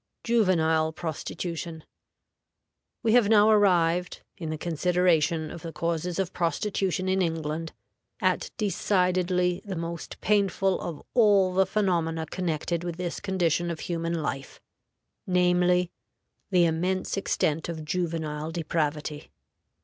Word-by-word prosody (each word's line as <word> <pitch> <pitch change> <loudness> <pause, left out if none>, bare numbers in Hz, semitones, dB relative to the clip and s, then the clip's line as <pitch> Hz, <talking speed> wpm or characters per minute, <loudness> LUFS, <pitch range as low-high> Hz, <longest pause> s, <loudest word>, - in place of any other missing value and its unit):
JUVENILE 160 -8 +2
PROSTITUTION. 165 0 -5 1.2
We 225 - +3
have 240 -4 +5
now 215 0 +6
arrived, 180 -4 +2
in 165 -3 -6
the 155 - -3
consideration 170 -1 +1
of 170 - -8
the 165 - -6
causes 170 +1 -2
of 190 -3 -2
prostitution 185 +1 -1
in 190 0 +2
England, 160 -1 -2 0.5
at - - +1
decidedly 180 -3 +1
the 200 -3 -5
most 170 0 -6
painful 195 -2 +1
of 165 -4 -6
all 200 -6 +4
the 190 0 +3
phenomena 170 -6 0
connected 170 0 -2
with 175 -1 -4
this 180 -2 -3
condition 175 -3 0
of 165 -2 -4
human 165 -1 -2
life, 135 -1 -5 0.7
namely, 180 -1 +3 0.6
the 180 -3 +4
immense 180 +3 0
extent 160 -5 0
of 160 -2 -5
juvenile 160 -2 -2
depravity. 155 -2 -2
175 Hz, 120 wpm, -27 LUFS, 160-185 Hz, 1.2 s, now